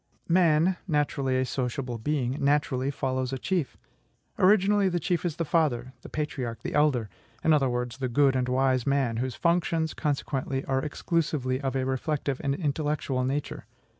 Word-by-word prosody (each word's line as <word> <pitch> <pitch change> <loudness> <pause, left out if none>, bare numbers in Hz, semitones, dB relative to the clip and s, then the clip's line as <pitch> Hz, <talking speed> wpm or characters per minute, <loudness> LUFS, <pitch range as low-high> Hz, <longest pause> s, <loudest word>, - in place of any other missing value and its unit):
Man 170 0 +3
(naturally 145 -4 0
a 130 - +1
sociable 125 -1 -3
being) 135 +1 -1
naturally 140 -2 +1
follows 130 -2 -2
a 135 - -2
chief. 175 0 -2 0.6
Originally, 200 +1 +4
the 175 -1 -1
chief 175 0 -1
is 170 -4 -1
the 165 - -2
father, 135 -6 0
the - - -10
patriarch, 135 -6 -4
the - - -4
elder; 145 -7 +2 0.4
in 160 - +4
other 135 -3 +3
words, 125 0 -3
the 130 -2 -1
good 135 +2 +3
and 125 -1 0
wise 130 -1 +1
man, 135 -5 +1
whose 125 +1 -2
functions, 170 -2 +1
consequently, 135 -2 -2
are 135 0 0
exclusively 145 -4 -1
of 135 -1 -2
a 130 -1 0
reflective 135 +1 -2
and 140 -1 +1
intellectual 145 -4 -1
nature. 135 +3 -3
140 Hz, 165 wpm, -27 LUFS, 130-155 Hz, 0.6 s, Originally